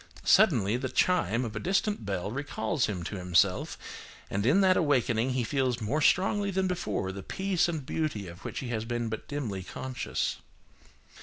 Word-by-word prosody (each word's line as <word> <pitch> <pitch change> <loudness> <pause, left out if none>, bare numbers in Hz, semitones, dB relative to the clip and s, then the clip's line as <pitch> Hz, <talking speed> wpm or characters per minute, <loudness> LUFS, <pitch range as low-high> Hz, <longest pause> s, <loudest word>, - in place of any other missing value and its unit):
Suddenly, 120 - +4
the 130 +1 -3
chime 130 - +2
of 110 - -6
a - - -2
distant 195 - 0
bell 95 0 -2
recalls 135 0 -1
him 95 -5 -3
to 100 - -5
himself, 90 -2 +2 0.5
and 100 +3 0
in 165 +10 +5
that 185 -1 +5
awakening 130 -5 +2
he 125 -1 0
feels 130 -1 0
more 125 +8 -1
strongly 200 +6 +3
than 190 0 0
before 110 - -2
the 95 +1 -7
peace 190 - 0
and 155 -5 -3
beauty 145 -10 -2
of 85 +2 -11
which - - -4
he 130 - -5
has 110 -2 -2
been 120 0 -2
but 110 - -5
dimly 120 -10 -3
conscious. 130 +7 -3
125 Hz, 175 wpm, -29 LUFS, 105-160 Hz, 0.5 s, in